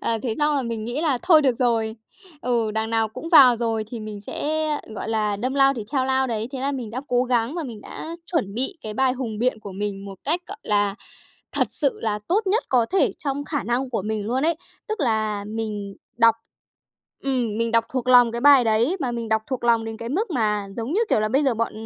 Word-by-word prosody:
Ờ, 230 Hz, -, 0 dB
thế 235 Hz, -4 st, -1 dB
xong 295 Hz, 0 st, +2 dB
là 275 Hz, -, 0 dB
mình 230 Hz, -3 st, -4 dB
nghĩ 240 Hz, +6 st, -3 dB
là 300 Hz, -6 st, +1 dB
thôi 320 Hz, -4 st, +6 dB
được 260 Hz, -4 st, +2 dB
rồi, 225 Hz, -3 st, +1 dB, 0.5 s
ừ, 235 Hz, -3 st, +1 dB
đằng 220 Hz, +1 st, -2 dB
nào 225 Hz, -1 st, +2 dB
cũng 315 Hz, +9 st, -7 dB
vào 265 Hz, -8 st, +8 dB
rồi 225 Hz, -2 st, -1 dB
thì 235 Hz, -, -5 dB
mình 215 Hz, -1 st, -7 dB
sẽ, 310 Hz, +9 st, -2 dB, 0.3 s
gọi 215 Hz, -, -5 dB
là, 215 Hz, -2 st, 0 dB
đâm 255 Hz, +6 st, -2 dB
lao 275 Hz, 0 st, +5 dB
thì 225 Hz, -5 st, -5 dB
theo 265 Hz, -3 st, +2 dB
lao 265 Hz, 0 st, +2 dB
đấy. 225 Hz, -2 st, -2 dB
Thế 265 Hz, -, -4 dB
là 275 Hz, +2 st, 0 dB
mình 250 Hz, -6 st, -5 dB
đã 245 Hz, +3 st, -4 dB
cố 245 Hz, 0 st, +2 dB
gắng 245 Hz, +1 st, 0 dB
và 340 Hz, -, -2 dB
mình 230 Hz, -6 st, -8 dB
đã 330 Hz, +9 st, -7 dB, 0.2 s
chuẩn 200 Hz, -, 0 dB
bị 265 Hz, -, 0 dB
cái 215 Hz, -1 st, -5 dB
bài 260 Hz, +2 st, +2 dB
hùng 240 Hz, -5 st, -4 dB
biện 245 Hz, -1 st, 0 dB
của 200 Hz, -2 st, -8 dB
mình 200 Hz, 0 st, -4 dB
một 195 Hz, -2 st, -9 dB
cách, 325 Hz, +5 st, 0 dB
gọi 405 Hz, +3 st, -8 dB
là, 205 Hz, -1 st, +1 dB, 0.6 s
thật -, -, +1 dB
sự 280 Hz, -3 st, -1 dB
là 215 Hz, -2 st, -1 dB
tốt 405 Hz, +4 st, +1 dB
nhất 425 Hz, +5 st, +2 dB
có 245 Hz, -3 st, +3 dB
thể 385 Hz, -, +2 dB
trong 285 Hz, 0 st, -3 dB
khả 290 Hz, -3 st, -2 dB
năng 245 Hz, +4 st, -1 dB
của 225 Hz, -5 st, -1 dB
mình 210 Hz, 0 st, -3 dB
luôn 255 Hz, +4 st, 0 dB
ấy. 330 Hz, +2 st, +3 dB, 0.3 s
Tức 435 Hz, -2 st, -3 dB
là 215 Hz, -5 st, 0 dB
mình 210 Hz, -2 st, -4 dB, 0.2 s
đọc 230 Hz, -1 st, +6 dB, 0.9 s
ừm, 245 Hz, -6 st, -1 dB
mình 230 Hz, 0 st, 0 dB
đọc 230 Hz, 0 st, +3 dB
thuộc 255 Hz, -1 st, -2 dB
lòng 245 Hz, -2 st, +7 dB
cái 235 Hz, -, -3 dB
bài 275 Hz, -1 st, +7 dB
đấy, 230 Hz, -, +2 dB
mà 250 Hz, -4 st, -1 dB
mình 235 Hz, -1 st, -4 dB
đọc 220 Hz, 0 st, +1 dB
thuộc 260 Hz, -3 st, -4 dB
lòng 230 Hz, -1 st, +3 dB
đến 225 Hz, 0 st, -5 dB
cái 230 Hz, +1 st, -6 dB
mức 385 Hz, -, -1 dB
mà 210 Hz, -7 st, 0 dB
giống 235 Hz, +5 st, -3 dB
như, 405 Hz, -, +2 dB
kiểu 220 Hz, -, +3 dB
là, 215 Hz, -, +1 dB
bây 270 Hz, +6 st, +2 dB
giờ 265 Hz, -3 st, +2 dB
bọn 230 Hz, +1 st, -1 dB
235 Hz, 245 wpm, -23 LUFS, 220-270 Hz, 0.9 s, vào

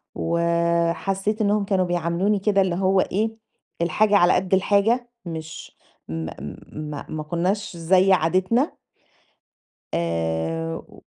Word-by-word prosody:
وحسِّيت 170 Hz, +5 st, 0 dB
إنَّهُم 205 Hz, 0 st, +2 dB
كانوا 190 Hz, -2 st, +1 dB
بيعاملوني 175 Hz, +4 st, 0 dB
كده، 200 Hz, 0 st, +2 dB
اللي 185 Hz, -2 st, +1 dB
هو 190 Hz, 0 st, +3 dB
إيه، 220 Hz, +3 st, -1 dB, 0.4 s
الحاجة 205 Hz, +5 st, +3 dB
على 175 Hz, -1 st, +5 dB
قد 185 Hz, +1 st, 0 dB
الحاجة، 215 Hz, +6 st, +2 dB, 0.2 s
مش، 160 Hz, -1 st, -8 dB, 0.3 s
م -, -, -4 dB, 0.3 s
م -, -, -7 dB, 0.3 s
ما 145 Hz, -1 st, -6 dB
ما 155 Hz, -1 st, -4 dB
كناش 180 Hz, +4 st, -2 dB
زي 185 Hz, +3 st, +4 dB
عادتنا. 185 Hz, -, +1 dB, 1.1 s
آآ 80 Hz, -1 st, -1 dB
و -, -, -14 dB
185 Hz, 120 wpm, -23 LUFS, 165-200 Hz, 1.1 s, على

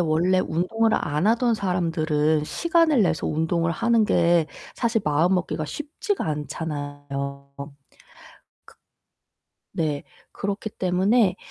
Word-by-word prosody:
원래 175 Hz, +3 st, +2 dB
운동을 220 Hz, +8 st, 0 dB
안 150 Hz, +5 st, 0 dB
하던 235 Hz, +1 st, +3 dB
사람들은 160 Hz, -5 st, 0 dB
시간을 330 Hz, -, +2 dB
내서 165 Hz, -4 st, 0 dB
운동을 165 Hz, +2 st, 0 dB
하는 230 Hz, +6 st, +2 dB
게 170 Hz, -4 st, +3 dB, 0.4 s
사실 225 Hz, -2 st, +1 dB
마음먹기가 165 Hz, +2 st, +1 dB
쉽지가 300 Hz, -, -3 dB
않잖아요. 145 Hz, -2 st, -5 dB
크 140 Hz, -, -5 dB, 2.1 s
네 150 Hz, -3 st, -1 dB, 0.3 s
그렇기 200 Hz, +2 st, -3 dB
때문에 190 Hz, +3 st, +2 dB
170 Hz, 235 characters per minute, -24 LUFS, 150-210 Hz, 2.1 s, 하던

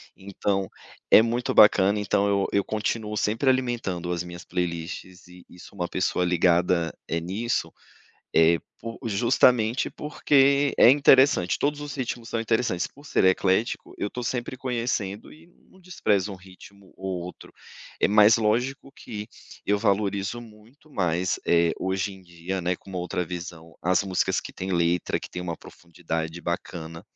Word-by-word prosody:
Então, 100 Hz, 0 st, -2 dB, 0.4 s
é -, -, +9 dB
muito 120 Hz, +2 st, -1 dB
bacana, 105 Hz, 0 st, +6 dB
então 100 Hz, 0 st, +1 dB
eu 100 Hz, -1 st, +1 dB
eu 100 Hz, -, +2 dB
continuo 105 Hz, 0 st, -3 dB
sempre 115 Hz, +6 st, +1 dB
alimentando 120 Hz, -9 st, -1 dB
as 85 Hz, 0 st, -2 dB
minhas 85 Hz, 0 st, -10 dB
playlists 90 Hz, +1 st, -5 dB
e 90 Hz, 0 st, -15 dB
e 90 Hz, -, -16 dB
sou 100 Hz, -, -14 dB
uma 90 Hz, -1 st, -2 dB
pessoa 90 Hz, -1 st, 0 dB
ligada, 85 Hz, -1 st, +2 dB
eh, 85 Hz, -, 0 dB
nisso, 100 Hz, +8 st, -2 dB, 0.6 s
eh, 80 Hz, +1 st, +5 dB, 0.2 s
por 115 Hz, 0 st, -7 dB
justamente 115 Hz, +2 st, +3 dB
porque 140 Hz, -1 st, +2 dB
é 120 Hz, -, +8 dB
interessante, 135 Hz, -8 st, +4 dB
todos 145 Hz, +1 st, -1 dB
os 145 Hz, -2 st, -6 dB
ritmos 120 Hz, -3 st, -4 dB
são 115 Hz, -, -2 dB
interessantes, 115 Hz, -5 st, 0 dB
por 145 Hz, +1 st, -17 dB
ser -, -, +1 dB
eclético, 95 Hz, +4 st, +1 dB
eu 100 Hz, -, -2 dB
estou 125 Hz, -, -6 dB
sempre 120 Hz, +1 st, -3 dB
conhecendo 115 Hz, -5 st, -3 dB
e 165 Hz, +3 st, -18 dB, 0.2 s
não 190 Hz, -, -20 dB
desprezo 105 Hz, -, 0 dB
um 95 Hz, -, -7 dB
ritmo 95 Hz, +1 st, -16 dB
ou 95 Hz, -2 st, -4 dB
outro. 90 Hz, -, -11 dB, 0.5 s
É -, -, +3 dB
mas 105 Hz, +1 st, +6 dB
lógico 125 Hz, +5 st, -1 dB
que, 105 Hz, -1 st, -8 dB, 0.4 s
eu 105 Hz, 0 st, +1 dB
valorizo 100 Hz, +1 st, 0 dB
muito 115 Hz, +7 st, -18 dB
mais, 90 Hz, -, -1 dB
eh, 85 Hz, -1 st, +3 dB
hoje 95 Hz, +2 st, -1 dB
em 95 Hz, -, -13 dB
dia, 90 Hz, +1 st, -5 dB
né, 90 Hz, +1 st, -1 dB
com 95 Hz, -, -14 dB
outra 90 Hz, -1 st, -2 dB
visão, 85 Hz, -2 st, -8 dB
as 90 Hz, +2 st, +2 dB
músicas 95 Hz, -2 st, 0 dB
que -, -, -9 dB
têm 95 Hz, +1 st, -5 dB
letra, 85 Hz, 0 st, +1 dB
que -, -, -10 dB
têm 90 Hz, -, -6 dB
uma 85 Hz, -2 st, -4 dB
profundidade 80 Hz, -1 st, -6 dB
bacana, 85 Hz, -2 st, -5 dB
100 Hz, 160 wpm, -25 LUFS, 90-115 Hz, 0.6 s, é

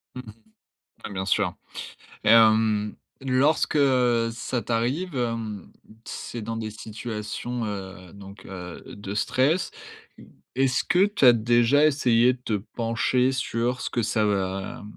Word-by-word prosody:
Mmh 125 Hz, -, -5 dB
mh. 110 Hz, -4 st, -12 dB, 0.8 s
Ouais, -, -, -9 dB
bien 95 Hz, 0 st, -3 dB
sûr 100 Hz, -, +1 dB, 0.7 s
et -, -, +2 dB
hem, 110 Hz, -2 st, +4 dB, 0.3 s
lorsque 135 Hz, +3 st, +2 dB, 0.5 s
ça 120 Hz, +1 st, -3 dB
t'arrive, 130 Hz, +9 st, -1 dB
hem, 115 Hz, -5 st, -3 dB, 0.3 s
c'est 120 Hz, -, -6 dB
dans 115 Hz, +1 st, -4 dB
des 110 Hz, -1 st, -4 dB
situations, 110 Hz, +2 st, -5 dB
heu, 95 Hz, -3 st, -7 dB
donc, 100 Hz, 0 st, -12 dB
heu, 90 Hz, -3 st, -8 dB
de 100 Hz, -1 st, -6 dB
stress. 145 Hz, -, +1 dB, 0.8 s
Est-ce 130 Hz, -1 st, +2 dB
que 185 Hz, +3 st, +3 dB
tu 205 Hz, -9 st, +1 dB
as 125 Hz, -, +9 dB
déjà 120 Hz, +5 st, +3 dB
essayé 125 Hz, -4 st, +3 dB
de 125 Hz, -, -12 dB
te 120 Hz, -, -4 dB, 0.2 s
pencher 125 Hz, +2 st, +1 dB
sur 125 Hz, -1 st, -2 dB
ce -, -, -3 dB
que 120 Hz, -, -1 dB
ça 110 Hz, 0 st, +1 dB
va 95 Hz, -1 st, -2 dB
115 Hz, 135 wpm, -25 LUFS, 105-125 Hz, 0.8 s, as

